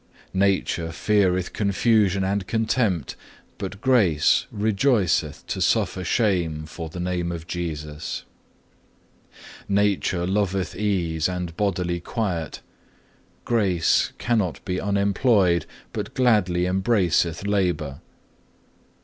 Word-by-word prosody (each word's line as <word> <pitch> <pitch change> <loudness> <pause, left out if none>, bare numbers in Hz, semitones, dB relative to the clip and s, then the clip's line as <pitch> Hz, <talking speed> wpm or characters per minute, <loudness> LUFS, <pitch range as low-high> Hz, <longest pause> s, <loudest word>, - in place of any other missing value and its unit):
"Nature 95 -3 +1
feareth 95 -1 +1
confusion 100 -1 +2
and 95 0 -1
contempt, 110 - 0 0.4
but 100 0 -5
Grace 100 - +3
rejoiceth 105 - +1
to - - -4
suffer 95 - +1
shame 85 -7 0
for 80 +1 -7
the 90 - -8
name 90 -1 -2
of 85 -2 -6
Jesus. 80 -4 -5 1.4
7. 100 - 0
"Nature 100 -3 +1
loveth 95 -2 -1
ease 90 -6 0
and 90 -2 -4
bodily 90 -4 -1
quiet; 90 -5 -3 0.8
Grace 95 -8 +2
cannot 110 -8 -1
be 90 -2 -2
unemployed, 100 - +2 0.3
but - - -5
gladly 105 -8 +2
embraceth 90 -3 +1
labour. 90 -9 0
8. - - -27
95 Hz, 100 wpm, -24 LUFS, 85-105 Hz, 1.4 s, Grace